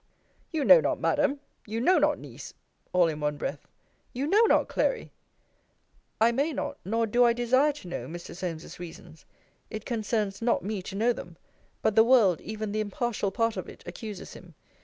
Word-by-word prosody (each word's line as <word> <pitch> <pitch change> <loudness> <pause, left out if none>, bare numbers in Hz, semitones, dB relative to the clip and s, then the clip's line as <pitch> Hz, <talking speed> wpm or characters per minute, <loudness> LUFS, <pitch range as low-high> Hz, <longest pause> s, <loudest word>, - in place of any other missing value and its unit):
You 315 -4 -1
know - - +9
not, - - 0
Madam; 290 -1 +1 0.3
You 220 +2 -3
know 350 +8 +4
not, 295 0 +3
Niece; - - -10 0.4
all 180 -2 +4
in 155 -2 -3
one 150 0 -1
breath. - - -5 0.5
You 260 +3 -2
know 400 +8 +4
not, - - +3
Clary; - - -1 1.1
I 225 +2 +5
may 280 +6 0
not, - - -4
nor 225 +4 0
do 240 +3 +3
I 235 -1 +5
desire 255 +5 +3
to 275 -10 -11
know 130 -8 -5
Mr. 170 +3 -8
Solmes's 170 -3 -6
reasons. 165 -2 -11 0.4
It 215 -1 -6
concerns 215 -3 -2
not 235 -6 +1
me 205 0 -3
to 190 - -8
know 230 +4 +2
them: - - -10 0.5
but 210 - +2
the 220 - +8
world, 225 -8 +4
even 215 -1 -5
the 215 - -1
impartial 215 0 -2
part 230 +3 0
of - - -5
it, - - -13
accuses 215 -6 -7
him. - - -14
220 Hz, 185 wpm, -28 LUFS, 190-255 Hz, 1.1 s, know